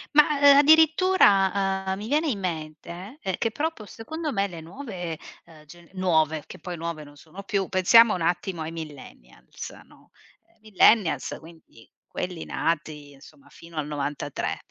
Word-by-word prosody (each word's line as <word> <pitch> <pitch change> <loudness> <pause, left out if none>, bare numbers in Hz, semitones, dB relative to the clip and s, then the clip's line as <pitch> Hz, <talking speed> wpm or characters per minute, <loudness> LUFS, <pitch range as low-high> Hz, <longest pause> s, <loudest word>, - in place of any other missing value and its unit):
Ma, 300 -1 +5
ehm, 285 -1 +7
addirittura, 240 - +4
uhm, 190 0 -1
mi 210 +2 -7
viene 305 +4 +1
in 235 -9 -1
mente, 170 - -6
ehm, 190 -2 -2
che 230 - -1
però 320 +7 -2
poi 215 - -12
secondo 300 - -6
me 200 -4 0
le 170 -3 -9
nuove, 180 - -7 0.3
ehm, 155 -2 -18
ge 170 +3 -16
nuove, 160 -4 +1
che - - -10
poi 175 +1 -7
nuove 165 -1 -5
non 145 0 -16
sono 175 +7 -12
più, 195 -1 -1
pensiamo 220 +5 +5
un 180 - -3
attimo 175 +1 -1
ai 160 +1 -5
Millennials, 145 - -10
no: - - -23 0.5
Millennials, 215 -2 +3
quindi 160 -8 -17 0.2
quelli 180 -3 -5
nati 155 -3 -3
insomma 155 - -18
fino 170 0 -15
al 155 -2 -3
'93 145 -1 -4
180 Hz, 160 wpm, -25 LUFS, 160-220 Hz, 0.5 s, ehm